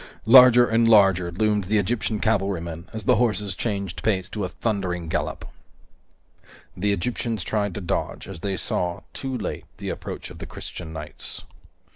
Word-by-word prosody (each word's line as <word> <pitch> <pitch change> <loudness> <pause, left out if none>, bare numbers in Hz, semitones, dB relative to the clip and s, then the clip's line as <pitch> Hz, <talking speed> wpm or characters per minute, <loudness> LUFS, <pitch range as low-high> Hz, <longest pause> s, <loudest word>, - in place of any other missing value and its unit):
Larger 125 +1 +9
and 115 +1 +3
larger 95 -5 +5
loomed 105 +2 +1
the 105 +4 +1
Egyptian 105 +1 0
cavalrymen 95 -5 -1
as 110 -1 -6
the - - +4
horses 105 -5 +1
changed 100 -5 -3
pace 95 -4 0
to 105 - -4
a 90 - -2
thundering 90 -7 -2
gallop. - - -2 1.3
The 100 +3 0
Egyptians 110 +1 -2
tried 105 -2 -1
to 105 - -4
dodge, 90 - -3
as 95 -4 -8
they 95 +1 -2
saw, 90 0 -2
too 130 -1 -4
late, 110 - -5
the - - -5
approach - - -6
of - - -11
the - - -7
Christian 80 -3 -8
knights. 80 - -8
100 Hz, 160 wpm, -24 LUFS, 90-110 Hz, 1.3 s, Larger